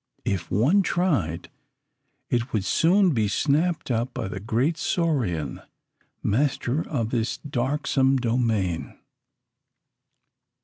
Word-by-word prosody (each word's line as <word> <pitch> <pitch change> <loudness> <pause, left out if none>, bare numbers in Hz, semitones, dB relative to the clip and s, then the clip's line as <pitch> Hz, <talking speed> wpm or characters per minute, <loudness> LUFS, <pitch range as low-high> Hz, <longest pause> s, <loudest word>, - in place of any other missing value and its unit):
If 90 -4 -2
one 140 - +3
tried, 140 - -1 0.8
it 120 +2 0
would 105 -5 -1
soon 185 - +4
be 110 -4 +1
snapped 155 - 0
up 120 +2 -1
by - - -3
the 95 - -5
great 120 - 0
saurian, 120 - -1 0.6
master 130 +3 0
of 115 -7 -1
this 115 -2 -1
darksome 135 0 0
domain. 115 -8 -1
125 Hz, 100 wpm, -25 LUFS, 110-150 Hz, 0.8 s, soon